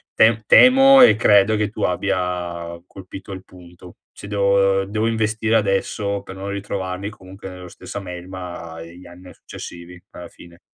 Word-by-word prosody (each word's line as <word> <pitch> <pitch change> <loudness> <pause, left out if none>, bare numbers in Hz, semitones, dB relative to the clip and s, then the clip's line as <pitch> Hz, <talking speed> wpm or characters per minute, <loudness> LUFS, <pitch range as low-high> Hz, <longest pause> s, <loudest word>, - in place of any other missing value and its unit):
tem 110 0 +4
temo 270 +1 +7
e 250 - +7
credo 105 -1 +4
che 105 - 0
tu - - -9
abbia 85 -2 -3
colpito 95 +1 -11
il 95 - -9
punto, 90 -1 -16 0.2
se - - -11
devo 100 -1 +2
devo 110 +3 -2
investire 110 0 -1
adesso 100 0 -2
per 95 - -10
non 100 +1 -6
ritrovarmi 100 -1 -5
comunque 95 -1 -12
nello 90 0 -11
stessa 95 +3 -9
melma 90 -2 -9
gli 85 +2 -14
anni 90 +1 -15
a - - -14
successivi 85 +1 -11
alla 90 - -11
fine. 85 0 -17
95 Hz, 155 wpm, -20 LUFS, 90-105 Hz, 0.2 s, temo